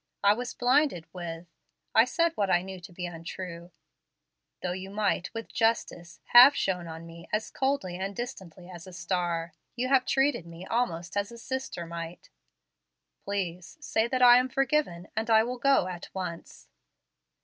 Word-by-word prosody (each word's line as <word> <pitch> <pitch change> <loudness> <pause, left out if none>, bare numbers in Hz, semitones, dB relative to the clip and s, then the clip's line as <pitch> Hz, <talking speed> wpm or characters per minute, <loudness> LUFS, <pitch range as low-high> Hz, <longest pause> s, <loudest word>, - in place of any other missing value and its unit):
I 200 +1 +6
was 245 +3 -5
blinded 250 - +2
with 170 -2 -6 0.5
I 225 - +7
said 335 +6 +1
what 200 -10 0
I 175 -1 +3
knew 190 0 -7
to 180 +2 -12
be 180 +1 -5
untrue. 170 0 -7 0.9
Though 180 - -1
you 190 +1 -5
might 205 -3 -1
with 225 0 -7
justice 175 -7 -1
have 255 +4 +9
shone 180 -7 -1
on 165 0 -8
me 170 0 -12
as 215 +1 -1
'coldly 265 -10 -1
and 195 +2 -4
distantly 190 -8 -7
as 175 -1 -10
a 185 - -11
star,' 175 -2 -2 0.2
you 255 +1 -1
have 265 -2 +3
treated 270 - +1
me 170 +2 -10
almost 190 -8 -2
as 205 +2 -1
a 235 - -10
sister 260 -7 -4
might. 170 0 -8 0.9
Please 180 - -4
say 225 -6 0
that 255 +1 +1
I 245 0 +9
am 255 +1 -1
forgiven, 270 - 0
and 220 +1 -2
I 220 -1 +6
will 245 +1 -4
go 275 -6 +4
at 180 -2 -6
once." 180 -3 -6
190 Hz, 170 wpm, -28 LUFS, 175-245 Hz, 0.9 s, have